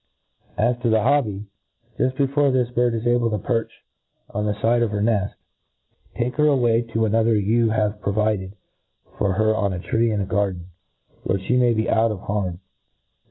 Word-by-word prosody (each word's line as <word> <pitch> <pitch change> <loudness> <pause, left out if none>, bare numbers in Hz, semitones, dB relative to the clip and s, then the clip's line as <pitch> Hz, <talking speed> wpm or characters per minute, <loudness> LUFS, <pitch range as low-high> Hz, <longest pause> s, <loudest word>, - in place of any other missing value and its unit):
A - - -1
s 120 +1 +1
to 120 - +1
the 110 -1 +2
hobby; 115 -7 +1 0.5
juft 130 0 0
before 140 0 +2
this 125 -2 0
bird 120 -1 +1
is 115 +1 -4
able 120 -1 +2
to 105 - -1
perch 115 +4 -3 0.5
on 105 +1 -2
the 105 - -1
fide 115 +3 +1
of 115 - +1
her 105 0 -3
neft, 105 -2 0 0.8
take* 125 +2 -2
her 150 0 +4
away 120 -5 +3
to 115 -1 -1
another 115 +1 +2
you 110 +3 +2
have 105 -1 -1
provided 100 -1 -1 0.6
for 100 -2 +1
her 110 +3 +2
on 100 -3 0
a 90 - -4
tree 115 +5 0
in 105 -2 -1
a 100 - -1
garden, 95 -3 -1 0.6
where 95 - 0
(he 95 +6 -1
may 120 -2 +3
be 110 +1 0
out 115 0 +2
of 105 -4 -5
harm. 95 -4 -3
110 Hz, 190 wpm, -22 LUFS, 105-120 Hz, 0.8 s, her